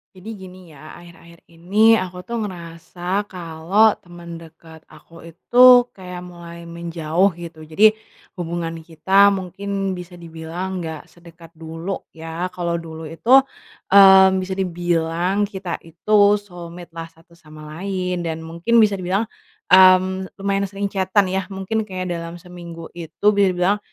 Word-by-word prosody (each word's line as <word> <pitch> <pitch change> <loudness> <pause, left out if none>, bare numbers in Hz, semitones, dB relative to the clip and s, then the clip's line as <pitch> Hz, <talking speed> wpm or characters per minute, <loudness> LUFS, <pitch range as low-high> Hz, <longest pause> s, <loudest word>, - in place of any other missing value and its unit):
Jadi 185 +4 -11
gini 185 -2 -13
ya, 155 +1 -13
akhir-akhir 170 -1 -16
ini, 210 +7 +3
aku 180 -1 -6
tuh 235 +3 -4
ngerasa 175 +2 -5
kalo 180 +4 +1
teman 170 -1 -11
dekat 160 0 -15
aku 165 0 -17
itu, 240 +9 +3 0.3
kayak 180 -2 -9
mulai 170 -1 -11
menjauh, 170 +2 -1
gitu. 165 -2 -10
Jadi, 210 +8 +5 0.5
hubungan 165 -1 -4
kita 185 +5 +3
mungkin 195 +1 -4
bisa 180 -1 -8
dibilang 170 +2 -6
nggak 160 -3 -7
sedekat 170 -1 -16
dulu 165 +3 -7
ya, 165 +2 -5
kalo 170 -1 -2
dulu 160 -1 -9
itu, 165 +11 +2 0.6
eee, 190 -1 +8
bisa 185 0 -4
dibilang 175 +1 -1
kita 190 -4 -4
itu 205 +5 +2
soulmate-lah 170 -3 -10
satu 165 +1 -23
sama 155 -2 -14
lain, 180 -1 -3
dan 165 -1 -4
mungkin 170 +8 0
bisa 210 -2 +4
dibilang, 190 +4 -2 0.4
mmm, 185 0 +5
lumayan 195 0 -1
sering 200 0 -3
chat-an 195 0 +1
ya, 190 +1 -1
mungkin 195 +3 -2
kayak 185 -3 -6
dalam 170 +1 -7
seminggu 170 -2 -10
itu 170 +2 -9
bisa 200 -1 +4
dibilang, 180 +3 +1
175 Hz, 140 wpm, -20 LUFS, 165-190 Hz, 0.6 s, eee